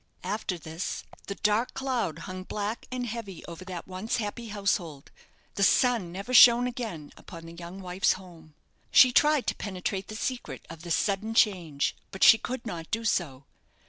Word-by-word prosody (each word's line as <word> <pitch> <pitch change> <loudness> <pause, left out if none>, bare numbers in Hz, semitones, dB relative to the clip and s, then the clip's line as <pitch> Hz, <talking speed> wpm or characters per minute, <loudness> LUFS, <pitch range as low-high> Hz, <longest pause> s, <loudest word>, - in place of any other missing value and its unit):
After 205 -4 -2
this, 160 +2 -5 0.2
the 200 - -4
dark 215 +4 +1
cloud 240 - -2
hung 185 -1 -6
black 210 +3 -4
and 250 -1 -3
heavy 220 -6 -6
over 170 +2 -9
that 180 -3 -7
once 190 +4 -3
happy 230 +1 -4
household; 195 -8 -2 0.4
the - - -4
sun 230 -3 +3
never 200 +7 -6
shone 245 0 +8
again 225 -12 -5
upon 165 -2 -11
the 165 - -10
young 175 +3 -9
wife's 185 +1 +1
home. 165 -5 -14 0.3
She 255 - +7
tried 295 +1 +4
to - - 0
penetrate 190 0 -4
the 215 - -8
secret 225 - -4
of 165 -1 -10
this 170 -1 0
sudden 215 +2 -1
change, 170 -11 +2
but 190 - -3
she 225 - +9
could 250 +2 -5
not 170 -6 -6
do 225 +1 -2
so. 140 -10 -1
195 Hz, 175 wpm, -28 LUFS, 170-230 Hz, 0.4 s, she